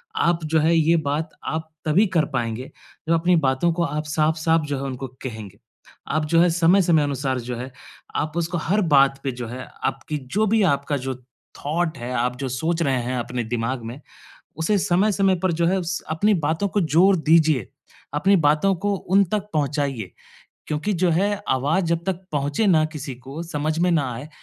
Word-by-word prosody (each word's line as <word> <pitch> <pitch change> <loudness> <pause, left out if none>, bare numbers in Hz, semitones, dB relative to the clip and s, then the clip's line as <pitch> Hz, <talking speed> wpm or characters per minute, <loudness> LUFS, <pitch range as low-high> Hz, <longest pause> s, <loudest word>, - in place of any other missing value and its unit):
आप 170 - +1
जो 160 +1 +2
है 160 +2 +3
ये 165 +1 +4
बात 155 +3 -1 0.2
आप 160 0 -3 0.2
तभी 165 +8 +4
कर 155 -2 +4
पाएँगे 120 0 -3 0.4
जब 165 - +3
अपनी 175 +2 +3
बातों 130 +6 +2
को 170 +1 0
आप 150 -1 -2
साफ़-साफ़ 160 +2 +1
जो 145 -1 -2
है 135 - -4
उनको 135 -1 -4 0.2
कहेंगे। 110 -6 -7 0.5
आप 155 +2 0
जो 165 - +6
है 175 - +5
समय-समय 170 -1 +4
अनुसार 135 -2 -1
जो 125 +1 -5
है 125 +2 -6 0.4
आप 155 0 -1
उसको 170 +1 -1
हर 185 +6 +1
बात 135 0 +4
पे 135 - -1
जो 120 -1 -6
है 125 +3 -7 0.2
आपकी 135 +3 -2 0.2
जो 215 +1 +3
भी 220 +1 +3
आपका 140 -4 +1
जो 130 0 -4 0.4
थॉट 160 +3 -1
है, 120 +1 -6
आप 125 0 0
जो 135 0 -3
सोच 160 +7 -1
रहे 135 -4 +1
हैं 125 +1 -2
अपने 120 0 -3
दिमाग 120 +2 -2
में, 120 +4 -7 0.6
उसे 165 +6 +1
समय-समय 195 +1 +2
पर 185 - +2
जो 170 +1 0
है 190 +1 +1
स 175 +2 -3
अपनी 205 +7 +2
बातों 160 +4 0
को 205 - 0
ज़ोर 175 +5 +4
दीजिए, 155 - +3 0.5
अपनी 190 +7 +3
बातों 155 +7 +3
को 205 0 +1
उन 195 +1 +2
तक 210 -1 -1
पहुँचाइए। 140 - -1 0.6
क्योंकि 155 +7 -1
जो 180 -1 +1
है 190 +5 +2 0.2
आवाज़ 145 +8 +1
जब 165 0 0
तक 190 -1 -2
पहुँचे 145 +8 0
ना 160 -5 +4
किसी 140 -3 -5
को 135 +6 -8
समझ 155 -1 -2
में 180 +1 +3
ना 145 -6 +1
आए, 130 +6 -8
155 Hz, 195 wpm, -23 LUFS, 135-170 Hz, 0.6 s, जो